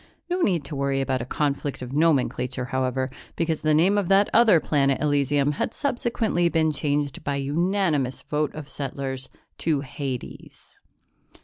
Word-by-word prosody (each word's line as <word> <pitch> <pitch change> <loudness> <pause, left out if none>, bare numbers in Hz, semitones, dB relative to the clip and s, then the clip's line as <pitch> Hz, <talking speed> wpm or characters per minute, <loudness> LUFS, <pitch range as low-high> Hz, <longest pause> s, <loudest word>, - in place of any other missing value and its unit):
No 360 +1 0
need 175 - +1
to 150 - -6
worry 140 0 0
about 130 -2 0
a - - -4
conflict 140 0 -2
of 125 +1 -7
nomenclature, 130 -4 +1
however, 130 0 0 0.3
because 165 -2 -1
the 155 - +2
name 190 +6 +4
of 195 - -2
that 195 +2 +4
other 225 -7 +6
planet 140 -2 +1
Elysium 145 -1 +2
had - - -1
subsequently 235 - 0
been 160 -2 +2
changed 145 -1 -1
by 140 - -1
unanimous 150 -1 0
vote 150 0 -1
of 155 -2 -7
settlers 135 -2 -4 0.3
to 155 -4 +1
Hades. 135 -2 -7
145 Hz, 150 wpm, -25 LUFS, 135-170 Hz, 0.3 s, other